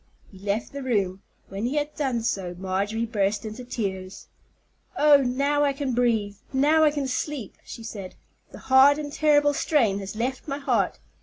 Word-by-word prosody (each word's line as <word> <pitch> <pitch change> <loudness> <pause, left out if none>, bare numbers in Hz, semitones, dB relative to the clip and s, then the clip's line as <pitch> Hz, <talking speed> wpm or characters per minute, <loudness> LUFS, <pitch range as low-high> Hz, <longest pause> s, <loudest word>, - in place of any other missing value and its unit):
He 190 - -14
left 205 +3 -2
the 280 - -5
room. 200 -7 -1 0.3
When 195 +4 -3
he 270 - -3
had 295 0 -1
done 260 -6 -1
so, 185 -6 -2
Marjorie 200 +5 -1
burst 210 -2 -1
into 220 +3 -7
tears. 190 -6 -5 0.7
"Oh, 295 -1 +7
now 280 +3 +1
I 280 -1 +2
can 275 -2 -3
breathe, 225 -4 +1
now 295 +4 +4
I 305 - +6
can 290 -2 -2
sleep," 260 -3 -4
she 230 - -9
said. 200 -4 -7 0.4
"The - - -10
hard 265 +2 +5
and 290 -1 -5
terrible 295 -2 +3
strain 235 -9 +1
has 195 +1 -7
left 255 +6 -3
my 275 -1 -2
heart. 285 - 0
245 Hz, 175 wpm, -25 LUFS, 205-285 Hz, 0.7 s, Oh